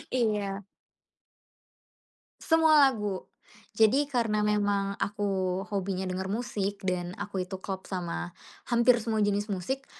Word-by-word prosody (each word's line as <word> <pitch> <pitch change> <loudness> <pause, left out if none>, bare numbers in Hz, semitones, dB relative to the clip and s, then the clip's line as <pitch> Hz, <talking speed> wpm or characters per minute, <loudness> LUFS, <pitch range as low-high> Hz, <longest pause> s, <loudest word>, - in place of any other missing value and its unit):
Iya. 205 -4 0 1.8
Semua 320 -2 +5
lagu. 210 -6 -3 0.5
Jadi 225 +7 +4
karena 225 -4 +1
memang 205 -1 +1
aku 195 -3 -1
hobinya 190 -2 -2
denger 185 +1 -3
musik, 205 -3 -2
dan 180 -2 -1
aku 200 -2 -3
itu 190 0 -6
klop 190 -1 -5
sama 175 -2 -3 0.4
hampir 240 +1 +5
semua 220 -1 0
jenis 205 0 +1
musik, 260 +9 -3
205 Hz, 115 wpm, -28 LUFS, 190-225 Hz, 1.8 s, Semua